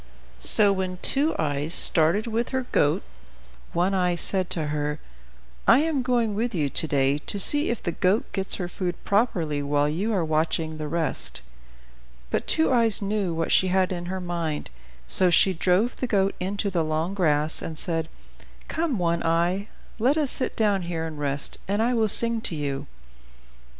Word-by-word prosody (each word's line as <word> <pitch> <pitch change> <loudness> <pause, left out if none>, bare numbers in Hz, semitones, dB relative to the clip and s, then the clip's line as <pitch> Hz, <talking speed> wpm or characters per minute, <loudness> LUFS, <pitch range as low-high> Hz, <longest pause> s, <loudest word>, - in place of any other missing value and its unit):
So 200 - +7
when 185 -1 -4
Two 290 +4 +1
Eyes 150 +1 +1
started 165 +6 +5
with 230 +1 -3
her 260 -1 -3
goat, 145 - +1 0.7
One 180 +3 0
Eye 180 -2 0
said 185 +1 0
to 155 -3 -2
her, 150 0 -3 0.7
"I 250 +5 +5
am 310 -4 -1
going 240 -4 -1
with 225 +1 -3
you 145 -5 -2
to 160 - -1
day 140 0 0
to 200 - -4
see 290 - +5
if 235 - -4
the 170 - -2
goat 185 +6 0
gets 195 -1 -1
her 180 - -5
food 180 0 -4
properly 175 -9 -1
while 145 0 0
you 185 +9 -2
are 185 -6 -1
watching 160 0 -2
the 155 - -5
rest." 160 +1 -2 0.9
But - - -2
Two 320 -4 +2
Eyes 230 -3 +4
knew 200 -4 -2
what 165 0 -3
she 190 - +3
had 185 0 0
in 175 -1 -5
her 190 +1 -4
mind. 170 - -5 0.4
So 185 -1 +4
she 190 +2 +3
drove 185 +7 0
the 255 - -3
goat 195 -3 0
into 200 +2 -3
the 170 -3 -1
long 155 +4 -3
grass, 155 -5 0
and 160 - -7
said, 165 0 -3 0.6
"Come, 320 -6 -2
One 170 -2 -1
Eye, 170 +4 -1 0.3
let 260 +7 +1
us 295 -4 0
sit 255 - -2
down 205 -3 0
here 170 -2 -5
and 155 -2 -8
rest, 140 -1 -1
and 200 +2 -1
I 235 +3 +1
will 225 -3 +1
sing 230 +2 +7
to 170 - -4
you." 140 -2 -4
180 Hz, 180 wpm, -24 LUFS, 160-215 Hz, 0.9 s, So